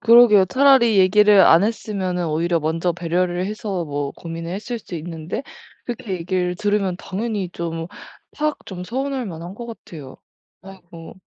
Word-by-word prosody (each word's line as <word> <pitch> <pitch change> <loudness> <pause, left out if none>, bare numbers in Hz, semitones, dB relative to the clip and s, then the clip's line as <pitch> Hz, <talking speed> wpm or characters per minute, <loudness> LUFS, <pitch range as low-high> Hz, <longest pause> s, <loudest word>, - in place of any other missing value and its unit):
그러게요. 230 -4 +7
차라리 255 -4 +4
얘기를 205 +2 +6
안 170 +3 +6
했으면은 195 -5 -2
오히려 165 +2 0
먼저 165 +3 0
배려를 175 +1 -1
해서 200 -4 -3
뭐 145 -1 -3
고민을 165 0 -7
했을 225 +5 -4
수 190 - -10
있는데 165 - -5 0.4
그렇게 240 -4 -5
얘기를 180 0 -1
들으면 205 -2 0
당연히 200 0 -3
좀 165 -1 -4 0.5
팍 305 0 -2
좀 180 -2 -7
서운할만한 225 -7 -4
것 235 - -8
같아요. 160 - -10 0.5
아이고. 175 -4 -12
185 Hz, 330 characters per minute, -21 LUFS, 170-215 Hz, 0.5 s, 그러게요